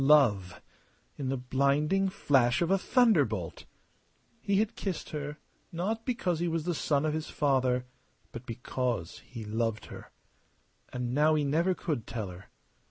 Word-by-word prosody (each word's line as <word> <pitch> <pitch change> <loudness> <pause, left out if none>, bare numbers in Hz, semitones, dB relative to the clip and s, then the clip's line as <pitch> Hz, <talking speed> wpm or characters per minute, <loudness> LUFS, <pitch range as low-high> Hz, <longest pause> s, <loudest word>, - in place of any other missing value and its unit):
Love 115 -11 +4 0.5
in 135 -3 -3
the 135 - 0
blinding 140 +9 +2
flash 135 -10 +3
of 170 - 0
a 195 - +5
thunderbolt! 145 - +2 0.7
He 200 -3 0
had 215 +1 +1
kissed 190 -5 -4
her 150 0 -4 0.3
not 215 +7 -2
because 185 -9 0
he 175 - 0
was 165 -1 -1
the 175 - 0
son 145 -2 +1
of 155 - +1
his 155 0 -3
father, 130 -3 +1 0.5
but 120 +1 -9
because 120 -5 -3
he 115 -4 -9
loved 115 +1 -1
her! - - -11 0.8
And 125 -1 -3
now 150 +3 +4
he 150 - +2
never 165 +6 +2
could 150 -12 -3
tell 110 -5 -4
her. 90 +2 -11
145 Hz, 155 wpm, -30 LUFS, 120-170 Hz, 0.8 s, a